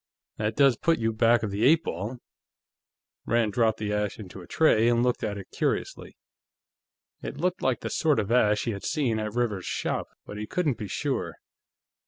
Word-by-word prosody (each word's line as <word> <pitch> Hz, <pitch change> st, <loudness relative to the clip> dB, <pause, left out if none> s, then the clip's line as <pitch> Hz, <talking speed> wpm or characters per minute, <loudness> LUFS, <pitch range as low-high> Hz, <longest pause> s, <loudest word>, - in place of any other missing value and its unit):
"That 110 Hz, 0 st, -1 dB
does 135 Hz, -4 st, +4 dB
put 165 Hz, -1 st, +2 dB
you 115 Hz, 0 st, 0 dB
back 115 Hz, +1 st, +3 dB
of 105 Hz, -, -2 dB
the 100 Hz, +3 st, -2 dB
eight 160 Hz, +6 st, +5 dB
ball." 100 Hz, +9 st, -4 dB, 1.1 s
Rand 115 Hz, -2 st, +1 dB
dropped 110 Hz, -1 st, +2 dB
the 105 Hz, -1 st, -3 dB
ash 105 Hz, -1 st, -1 dB
into 95 Hz, -3 st, -9 dB
a 90 Hz, -, -13 dB
tray 120 Hz, -8 st, +3 dB
and 120 Hz, 0 st, +2 dB
looked 125 Hz, -1 st, 0 dB
at 100 Hz, -1 st, -2 dB
it 100 Hz, -, -10 dB
curiously. -, -, -3 dB, 1.0 s
It -, -, -6 dB
looked 180 Hz, +4 st, -1 dB
like 130 Hz, -4 st, 0 dB
the -, -, -4 dB
sort 150 Hz, -6 st, +2 dB
of 105 Hz, 0 st, -2 dB
ash 105 Hz, -4 st, +3 dB
he 115 Hz, -, -1 dB
had 100 Hz, -2 st, -6 dB
seen 125 Hz, -8 st, 0 dB
at 110 Hz, 0 st, -4 dB
Rivers's 110 Hz, -7 st, -1 dB
shop, -, -, -2 dB, 0.2 s
but 105 Hz, -, -8 dB
he 105 Hz, -, -5 dB
couldn't 150 Hz, -5 st, -1 dB
be 105 Hz, -, -4 dB
sure. -, -, -2 dB
115 Hz, 195 wpm, -27 LUFS, 105-125 Hz, 1.1 s, eight